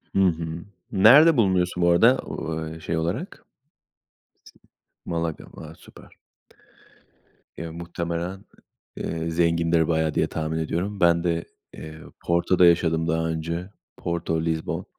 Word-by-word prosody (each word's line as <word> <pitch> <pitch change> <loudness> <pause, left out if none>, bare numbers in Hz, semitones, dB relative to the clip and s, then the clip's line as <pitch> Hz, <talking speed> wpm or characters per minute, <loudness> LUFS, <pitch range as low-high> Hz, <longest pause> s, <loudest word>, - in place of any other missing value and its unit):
Hı - - +3
hı. 85 -1 -1 0.3
Nerede 135 +10 +7
bulunuyorsun 90 -4 +1
bu 85 - +4
arada, 115 +10 +5
o 80 -1 -5
e 80 +1 -8
şey 80 +1 -3
olarak? 80 +1 -3 1.7
Sin - - -6
Malaga. 85 -1 -3
Va 80 0 -10
Süper. - - -17 1.4
Ya, 85 -1 -6
muhtemelen, 85 +2 -5 0.5
eee, 80 0 -3
zengindir 85 -1 +2
bayağı 80 -2 0
diye, - - +1
tahmin 80 0 -3
ediyorum. 90 +6 -3
Ben 85 0 +3
de, 85 -1 -1 0.3
eee, 80 0 -10 0.2
Porto'da 85 +1 +3
yaşadım 80 -1 +3
daha 80 0 0
önce. 85 +3 -4 0.3
Porto, 85 -1 -2
Lizbon. 80 -1 -3
85 Hz, 125 wpm, -24 LUFS, 80-85 Hz, 1.7 s, Nerede